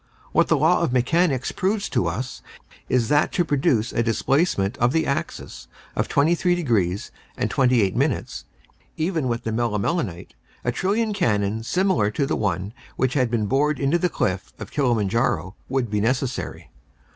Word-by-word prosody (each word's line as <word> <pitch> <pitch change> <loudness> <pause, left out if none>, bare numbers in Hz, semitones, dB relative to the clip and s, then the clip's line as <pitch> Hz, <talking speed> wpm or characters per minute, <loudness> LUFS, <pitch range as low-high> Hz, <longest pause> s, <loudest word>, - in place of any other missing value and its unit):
What - - +3
the - - +3
law - - +3
of - - +1
mechanics 135 +2 +1
proves 200 +2 -1
to 90 - 0
us 125 +10 -4 0.5
is 125 -3 +2
that 150 0 +3
to 175 - +1
produce 135 -6 +1
a - - +1
displacement 115 - +1
of 120 +3 +2
the 160 -1 +2
axis 140 - -4 0.3
of - - 0
23 175 +4 +2
degrees 105 - 0 0.3
and - - -1
28 125 -7 +2
minutes, - - -1 0.5
even 160 -4 0
with 115 -1 -2
the 110 - -2
melimelonite, 110 - -1 0.3
a 120 - +1
trillion 210 - 0
cannons 110 - 0
similar 185 - +2
to 140 +6 -1
the 150 - -1
one 95 0 -2 0.2
which 130 0 0
had 130 -4 +2
been 110 -2 0
bored 140 +5 +1
into 145 +5 +2
the 180 - +1
cliff 95 - -2
of - - -8
Kilimanjaro 115 -7 0 0.2
would 130 -4 -1
be 105 -1 +1
necessary. 130 +3 -2
125 Hz, 160 wpm, -23 LUFS, 110-155 Hz, 0.5 s, What